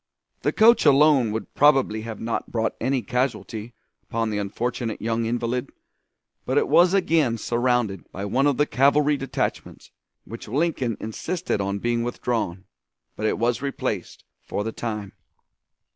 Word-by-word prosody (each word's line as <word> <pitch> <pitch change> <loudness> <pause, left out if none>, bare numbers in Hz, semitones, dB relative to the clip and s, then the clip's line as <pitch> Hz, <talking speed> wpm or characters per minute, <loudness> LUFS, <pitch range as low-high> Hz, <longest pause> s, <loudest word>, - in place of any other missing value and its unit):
The - - +1
coach 230 +2 +5
alone 140 -5 +5
would 110 +1 -5
probably 135 -7 +3
have 110 0 -7
not 115 0 -3
brought 110 -1 0
any 130 0 0
casualty 115 -1 -3 0.3
upon 115 -1 -2
the 105 - -1
unfortunate 115 +3 -3
young 115 +1 -1
invalid, 120 +2 -2 0.7
but - - -1
it 440 -1 +3
was 175 - +5
again 160 -10 +2
surrounded 120 -4 -1
by 100 +2 -5
one 135 +8 +2
of 140 - +1
the 145 - +3
cavalry 145 +2 +3
detachments, 135 -2 -4 0.3
which 115 0 -9
Lincoln 135 -3 -1
insisted 110 - -3
on 100 +1 -2
being 120 +3 0
withdrawn, 115 -6 -2 0.5
but 110 - -1
it - - 0
was 120 +1 0
replaced, 130 -9 -4 0.2
for 105 - -3
the 115 - -3
time. 105 -4 -5
120 Hz, 145 wpm, -24 LUFS, 110-140 Hz, 0.7 s, coach